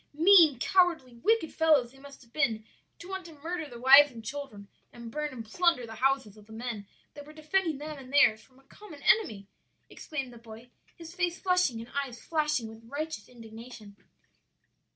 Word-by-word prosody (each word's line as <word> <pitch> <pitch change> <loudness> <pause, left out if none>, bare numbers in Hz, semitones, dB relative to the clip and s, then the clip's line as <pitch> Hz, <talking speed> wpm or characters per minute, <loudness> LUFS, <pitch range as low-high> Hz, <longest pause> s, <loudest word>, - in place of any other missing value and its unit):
"Mean, 330 -4 +6
cowardly, 340 -4 +2
wicked 370 - 0
fellows 300 -7 +3
they 270 - -19
must 280 -1 -14
have 235 - -25
been 230 -8 0 0.3
to 340 - -12
want 380 0 -5
to 330 - -13
murder 310 +1 -5
the 240 -2 -10
wives 275 +4 +8
and 230 -4 -12
children 225 -6 -7 0.2
and 235 -1 -10
burn 300 +3 -3
and 235 -3 -8
plunder 335 +1 +1
the 225 - -10
houses 265 -6 +1
of 210 0 -17
the - - -16
men 225 -3 -6 0.3
that 290 - -10
were 300 +1 -14
defending 315 +1 -1
them 300 0 -7
and 260 -1 -12
theirs 275 -7 +4
from 260 - -24
a 270 - -23
common 310 0 -14
enemy!" 220 - +2 0.4
exclaimed 270 -5 -6
the 235 - -13
boy, 230 +1 -13 0.2
his 330 0 -11
face 355 -1 -1
flushing 360 -11 +1
and 230 - -12
eyes 270 -4 -3
flashing 300 -7 -1
with 225 +1 -13
righteous 300 -5 -5
indignation. 225 -3 -12
275 Hz, 190 wpm, -29 LUFS, 235-320 Hz, 0.4 s, wives